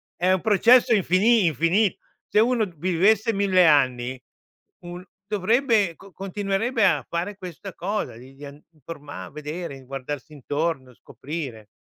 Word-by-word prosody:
È 180 +1 +1
un 185 -1 +2
processo 235 +4 +5
infini 200 +2 +3
infini 170 - +1 0.3
se - - +2
uno 230 0 +2
vivesse 195 +7 +2
1000 195 -3 +3
anni 130 -4 +2 0.6
un 175 +1 -9 0.2
dovrebbe 215 -2 +1
con 195 +3 -17
continuerebbe 200 +4 -1
a - - +2
fare 175 +5 -3
questa 185 0 -9
cosa 200 - -3
di 130 +3 -14
di 145 +2 -11
and 140 +1 -11
di 165 - -39
informar 145 - -9
vedere, 150 -2 -7
guardarsi 135 +3 -7
intorno, 145 -1 -3
scoprire. 130 -5 -8
175 Hz, 135 wpm, -24 LUFS, 145-205 Hz, 0.6 s, processo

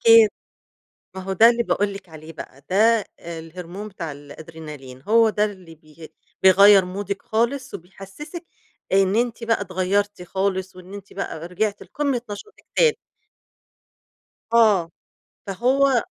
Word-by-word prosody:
أكيد، 225 -1 +8 0.9
ما 190 - -5
هو 190 +1 -3
ده 225 +5 +7
اللي 235 0 +1
باقول 205 -2 0
لِك 195 -2 -11
عليه 160 0 -11
بقى، 140 -3 -11
ده 215 +3 +4
الهرمون 170 +4 -8
بتاع 180 -6 -6
الأدرينالين، 145 -2 -11
هو 225 +6 +4
ده 210 0 +1
اللي 185 -5 -9
بي 155 +1 -15 0.3
بيغيّر 195 0 +7
مودِك 200 +1 -4
خالص، 240 +5 -1
وبيحسسِك 195 - -10 0.5
إن 195 0 +3
أنتِ 235 0 -1
بقى 230 -2 +1
اتغيّرتِ 200 +1 -1
خالص، 190 0 -2
وإن 185 +1 -12
أنتِ 200 -1 -10
بقى 170 -4 -5
رجعتِ 200 +3 -2
لقمة 280 -5 -2
نشاطِك 315 - -10
تاني. 470 -2 +4 1.6
آه، 205 -7 +4 0.6
فهو 255 +5 +2
195 Hz, 130 wpm, -22 LUFS, 175-225 Hz, 1.6 s, أكيد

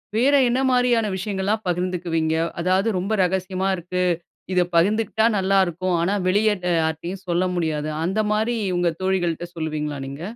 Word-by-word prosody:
வேற 265 +5 +3 0.2
என்ன 250 +2 +1
மாரியான 245 -3 +2
விஷயங்கள்லாம் 200 +2 -2
பகிர்ந்துக்குவீங்க? 175 -3 -1 0.2
அதாவது 185 +4 +1
ரொம்ப 195 +4 -2
ரகசியமா 185 +1 -1
இருக்கு. 180 +1 -3 0.5
"இதை 180 -1 +3
பகிர்ந்துக்கிட்டா 215 +4 +2
நல்லாருக்கும். 185 -2 +1
ஆனா 195 +4 +1
வெளியே 210 +2 +3 0.3
யார்ட்டயும் 170 +4 -3
சொல்ல 175 +2 +1
முடியாது" 155 -3 -1 0.2
அந்த 195 +5 0
மாரி 220 +3 0 0.2
உங்க 175 -1 +2
தோழிகள்ட்ட 175 -3 0
சொல்லுவீங்களா 150 -2 -3
நீங்க? 140 +3 -8
185 Hz, 135 wpm, -22 LUFS, 170-205 Hz, 0.5 s, வேற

